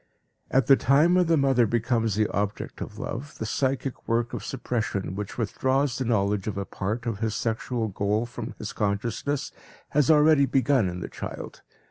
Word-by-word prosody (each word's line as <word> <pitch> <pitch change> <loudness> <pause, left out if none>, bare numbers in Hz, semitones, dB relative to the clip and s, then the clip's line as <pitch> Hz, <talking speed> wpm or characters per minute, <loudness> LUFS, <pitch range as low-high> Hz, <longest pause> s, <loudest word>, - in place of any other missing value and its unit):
At 130 -2 +3
the 135 - +7
time 145 +7 +4
when 180 -1 +4
the 165 -1 +4
mother 135 -4 +3
becomes 115 -1 +1
the 110 0 +2
object 100 0 -3
of - - -6
love, 140 +6 -6
the 110 - -3
psychic 135 +2 -2
work 120 +1 0
of - - -4
suppression 110 -7 -2
which 105 +1 -5
withdraws 130 +4 0
the 130 - -1
knowledge 105 -3 +1
of 105 - -3
a 100 - -2
part 110 +7 -3
of 115 -4 -2
his 110 -1 -1
sexual 115 +1 -1
goal 105 +3 0
from 120 - -7
his - - -6
consciousness 115 +8 -1 0.4
has 145 -3 +2
already 150 -2 +6
begun 130 -5 +2
in 90 0 -6
the - - -4
child. - - -7
120 Hz, 180 wpm, -26 LUFS, 105-135 Hz, 0.4 s, the